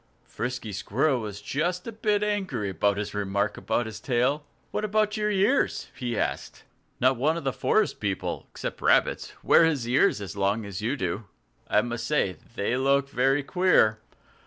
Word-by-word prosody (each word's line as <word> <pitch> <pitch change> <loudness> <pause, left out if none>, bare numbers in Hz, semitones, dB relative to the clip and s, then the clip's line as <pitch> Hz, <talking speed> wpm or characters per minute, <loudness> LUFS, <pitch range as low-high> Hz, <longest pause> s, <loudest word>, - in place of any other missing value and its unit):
Frisky 125 -3 -4
Squirrel 130 +8 +1
was 105 -2 -6
just 175 +5 -1
a 230 - -5
bit 210 -1 0
angry 190 - -1
at 100 +3 +1
this 105 0 -4
remark 100 0 -1
about 115 +1 -1
his 110 -1 -7
tail. 130 +5 +1 0.3
"What - - -2
about 215 0 +1
your 210 -1 0
ears?" 210 +7 +1
he 120 -3 -3
asked. - - -3 0.4
"Not 130 0 +3
one 155 +6 +1
of 170 - -5
the 135 -2 -1
forest 215 -1 +1
people 100 -3 -3
except - - -6
rabbits - - +2
wears 160 -6 +4
his - - -6
ears 105 -7 +2
so 100 - -8
long 100 +3 +1
as 100 0 -6
you 120 +7 -1
do. 95 +1 -3 0.4
I 105 - +3
must 120 -1 -4
say 150 -10 +2
that 115 - -19
they 100 +4 0
look 140 +1 +2
very 135 +2 +2
queer. 145 - +3
125 Hz, 180 wpm, -26 LUFS, 105-165 Hz, 0.4 s, wears